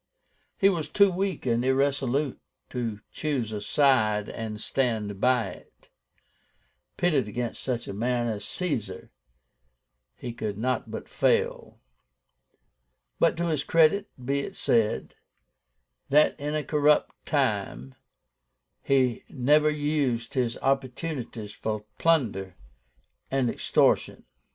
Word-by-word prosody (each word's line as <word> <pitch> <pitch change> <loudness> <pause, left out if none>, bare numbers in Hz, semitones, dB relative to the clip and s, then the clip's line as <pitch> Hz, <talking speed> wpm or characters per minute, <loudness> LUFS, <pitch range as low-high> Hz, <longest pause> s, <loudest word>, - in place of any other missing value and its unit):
He 195 - +5
was 165 -6 0
too 200 +4 +5
weak 190 -2 -2
and 120 -1 +1
irresolute 135 +1 +1 0.3
to 115 -4 -3
choose 135 -8 -2
a 105 -1 -4
side 110 -4 +2
and 110 -1 -5
stand 110 -6 -1
by 125 -5 +3
it. - - -15 1.1
Pitted 150 -10 +2
against 120 +2 -4
such 125 -3 -3
a - - -5
man 120 +3 0
as 110 -2 -3
Caesar, 120 - -3 1.0
he 120 - -6
could 105 -3 -4
not 125 +3 -1
but - - -6
fail. - - 0 1.4
But - - +3
to 170 - 0
his 150 -3 0
credit 165 +6 +3
be 135 +2 -1
it 140 - -5
said, 115 -2 +1 1.0
that 150 +2 +5
in 145 +1 -2
a 155 - 0
corrupt 150 0 +2
time 100 - -1 0.9
he 130 -4 +1
never 150 +3 +3
used 145 -6 -1
his 125 -3 0
opportunities 130 -5 -2
for 105 -1 -4
plunder 110 - +1 0.7
and 130 -3 +1
extortion." - - +1
130 Hz, 115 wpm, -27 LUFS, 110-150 Hz, 1.4 s, He